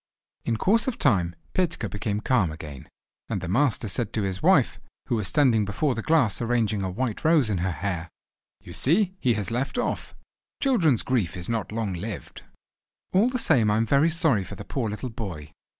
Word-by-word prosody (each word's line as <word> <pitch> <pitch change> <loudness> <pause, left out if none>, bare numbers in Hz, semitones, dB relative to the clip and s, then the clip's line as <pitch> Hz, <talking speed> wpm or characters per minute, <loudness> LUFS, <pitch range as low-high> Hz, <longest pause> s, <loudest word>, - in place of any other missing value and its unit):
In 115 - 0
course 220 - +2
of 260 - -1
time 90 - +2 0.2
Petka 165 -11 0
became 105 +1 -3
calm 110 -10 +2
again, 75 -4 -9 0.4
and - - -1
the 90 - -5
master 120 +3 +1
said 110 +2 -3
to 110 - 0
his 95 -1 -3
wife, - - +3 0.3
who - - +2
was 105 -4 -1
standing 115 - +3
before 115 +8 0
the 115 - -3
glass 130 - +2
arranging 115 -3 +1
a 95 - -2
white 115 +3 -3
rose 155 -8 +4
in 95 - 0
her 95 +2 0
hair: 90 +1 -3 0.5
"You 85 - -11
see 180 - +2
he 120 -4 +2
has 105 +1 -3
left 125 - -2
off. 245 - -2 0.4
Children's 170 - +3
grief 105 -9 0
is 85 - -2
not 115 -2 -2
long 110 -3 -2
lived." 100 +5 -6 0.7
"All 205 +6 +4
the 255 - -2
same 135 - +3
I 105 - +2
am 115 - +2
very 140 +8 +3
sorry 160 - +2
for - - -8
the 100 - -9
poor 120 -5 -2
little 105 +5 -4
boy." 85 -10 -6
110 Hz, 195 wpm, -25 LUFS, 100-140 Hz, 0.7 s, rose